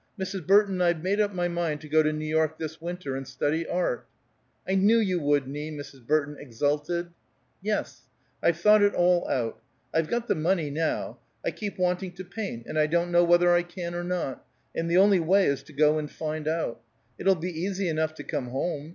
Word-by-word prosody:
"Mrs. 190 -3 -4
Burton, 195 -1 +4
I've 170 -2 +2
made 200 +3 +1
up 205 -1 +1
my 175 -2 -1
mind 170 -3 -2
to 155 - -10
go 155 +1 +4
to 155 0 +2
New 155 0 -4
York 155 0 +1
this 160 0 -6
winter, 170 -5 -4
and 135 -1 -5
study 145 +5 -1
art." 175 -9 -1 0.6
"I 190 - 0
knew 200 +4 +5
you 190 -6 +1
would, 145 -3 +1
Nie!" 150 +3 -5
Mrs. 145 -5 -9
Burton 150 -1 +1
exulted. 150 +7 -1 0.5
"Yes. 210 +2 -3 0.3
I've 170 - +2
thought 210 +3 +6
it 205 0 +3
all 175 0 +3
out. 115 -3 -1 0.3
I've 160 -1 +2
got 235 +4 -2
the - - +3
money, 160 -2 0
now. 160 +2 -2 0.3
I - - +1
keep 205 -2 -6
wanting 180 0 0
to 185 +1 -8
paint, 185 - -5
and 155 - -2
I 150 - +4
don't 170 +2 0
know 175 0 +5
whether 175 0 +5
I 175 - +4
can 175 0 -6
or 175 0 -3
not, 175 -7 -3 0.3
and 165 0 -2
the 170 - +3
only 195 0 +6
way 190 +4 +4
is 140 -1 +1
to - - -16
go 150 +1 +3
and 150 -1 -5
find 155 0 -4
out. 160 -7 -1 0.4
It'll 195 0 +4
be 180 +2 -4
easy 185 +3 -2
enough 155 -1 -1
to - - -8
come 145 -5 -3
home. 145 +4 -3
170 Hz, 210 wpm, -27 LUFS, 150-180 Hz, 0.6 s, thought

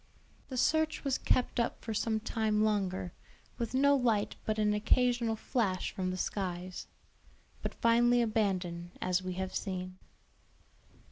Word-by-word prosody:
The 260 - -4
search 315 +4 +2
was 275 -2 0
kept 250 - +1
up 235 - 0
for 225 - -3
some 220 +1 0
time 215 -1 0
longer, 190 -4 0 0.5
with 235 +1 -2
no 280 +2 +5
light 230 -6 +1
but 215 0 0
an 210 -1 +2
occasional 235 +2 +2
flash 215 -5 -1
from 185 -1 -2
the 185 - -3
skies; 185 -1 -3 0.7
but - - -4
finally 240 +1 +4
abandoned, 185 -6 -1
as 185 0 +1
we 185 0 -4
have 185 +1 -4
seen. 185 -1 -4
215 Hz, 140 wpm, -32 LUFS, 185-235 Hz, 0.7 s, no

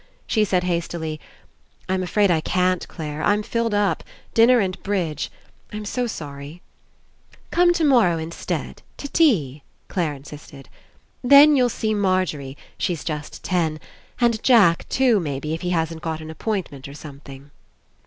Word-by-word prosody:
She 215 - +1
said 185 -2 +1
hastily: 170 -3 -3 0.7
"I'm 185 0 0
afraid 200 +1 +2
I 160 -2 +2
can't, 185 +2 0
Clare. 150 -2 -6
I'm 205 +3 +2
filled 230 -1 -1
up. 205 -1 +1 0.3
Dinner 235 +2 +6
and 185 -3 -2
bridge. 175 -7 -2 0.4
I'm 210 0 -6
so 245 +4 -2
sorry." 145 -3 -8 0.9
"Come 350 0 +4
tomorrow 260 - +3
instead, 160 +1 -5 0.2
to 285 - -6
tea," 175 - +2 0.3
Clare 165 -6 -1
33 - - -10
PASSING 140 +2 -12 0.2
insisted. 135 - -15 0.5
*'Then 285 +4 +8
you'll 250 -2 +3
see 220 -2 -1
Margery 185 -9 -1
— - - -30
she's 170 -4 -2
just 150 -2 -6
ten 165 -4 0 0.2
— - - -30
and 235 -3 +2
Jack 205 -10 +4
too, 250 -5 +3
maybe, 150 -2 -3
if 165 - -4
he 180 - -2
hasn't 165 -2 -1
got 160 -1 -3
an 155 0 -8
appointment 160 -7 -4
or 140 - -10
something." 140 -1 -12
180 Hz, 155 wpm, -22 LUFS, 155-215 Hz, 0.9 s, Then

